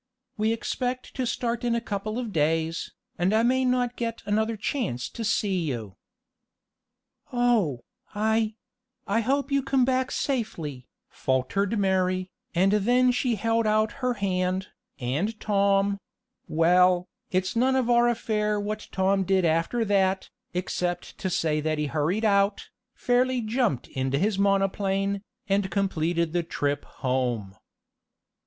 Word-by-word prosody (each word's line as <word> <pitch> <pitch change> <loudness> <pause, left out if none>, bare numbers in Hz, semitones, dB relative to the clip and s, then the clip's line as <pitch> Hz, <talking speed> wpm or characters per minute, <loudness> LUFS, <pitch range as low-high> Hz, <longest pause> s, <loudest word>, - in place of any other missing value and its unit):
"We 215 +1 +1
expect 250 +2 -3
to 255 -2 -2
start 235 0 -2
in 240 -1 +1
a - - +1
couple 215 0 -4
of 235 -5 -4
days, 160 +1 0 0.3
and 185 +4 +2
I 225 - +4
may 260 +2 +3
not 250 -1 +1
get 230 -1 -4
another 220 +2 0
chance 205 - -2
to 230 - -6
see 200 -3 +1
you." 120 - -4 1.4
"Oh, 225 - +2 0.3
I 220 +1 +1 0.5
I 205 +3 +1
hope 275 +4 0
you 275 0 +3
come 270 -1 +2
back 260 0 +1
safely," 165 - -3 0.2
faltered 160 - 0
Mary, 185 -1 +1 0.2
and 190 +3 +4
then 245 +5 +4
she 245 0 0
held 225 +1 +1
out 215 0 +2
her 250 -1 +1
hand, 185 -1 -1 0.3
and 155 - -2
Tom 200 -1 +2 0.5
well, 180 +2 +4 0.2
it's 185 +2 0
none 260 +3 +3
of 260 -3 +1
our 240 0 +4
affair 210 -2 0
what 210 +1 -4
Tom 195 +1 +2
did 190 -1 +2
after 165 +9 +1
that, 195 -2 +1 0.2
except 180 0 -2
to 190 - -1
say 155 -3 0
that 155 0 -1
he 150 - 0
hurried 160 +9 0
out, 200 -1 +2 0.3
fairly 250 +1 +2
jumped 225 - 0
into 130 +1 -1
his 200 +4 +1
monoplane, 195 0 +1 0.3
and 195 -1 +1
completed 170 -3 0
the 175 - +2
trip 145 -3 -2
home. 125 -7 -2
200 Hz, 140 wpm, -26 LUFS, 175-230 Hz, 1.4 s, I